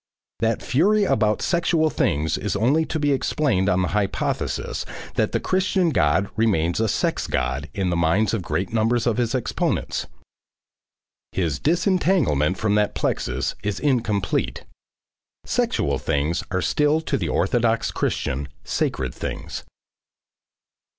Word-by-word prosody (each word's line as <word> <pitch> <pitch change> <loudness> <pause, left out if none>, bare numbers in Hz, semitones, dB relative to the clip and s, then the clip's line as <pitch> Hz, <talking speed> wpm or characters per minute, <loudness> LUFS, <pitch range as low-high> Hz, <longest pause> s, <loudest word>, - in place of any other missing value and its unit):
That 115 +1 0
fury 205 +10 +3
about 105 - +1
sexual 170 -2 +2
things 75 - 0
is 105 -3 -2
only 135 +10 +2
to 160 - -3
be 145 -1 +1
explained 130 -7 +1
on 90 0 +2
the - - -1
hypothesis 105 -2 -1 0.3
that - - +1
the - - 0
Christian 185 -2 +1
God 85 - +2
remains 90 -7 +1
a 110 - +2
sex - - 0
God 65 +3 -2
in 95 -3 0
the - - 0
minds 90 +7 +2
of 115 - 0
great 90 +5 -2
numbers 115 +1 +2
of 120 -3 +1
his 120 +1 0
exponents. 125 - -1 1.3
His 80 -7 -1
disentanglement 160 - +2
from 105 -2 0
that 105 0 +1
plexus 65 +1 -1
is 105 0 -2
incomplete. 120 -8 0 0.8
Sexual 70 -1 0
things 75 +4 0
are 95 -1 -1
still 150 +1 +2
to 155 -3 -2
the - - -1
orthodox 115 -2 +1
Christian, 70 +2 -2 0.2
sacred 65 -2 -1
things. - - -5
110 Hz, 135 wpm, -23 LUFS, 85-145 Hz, 1.3 s, fury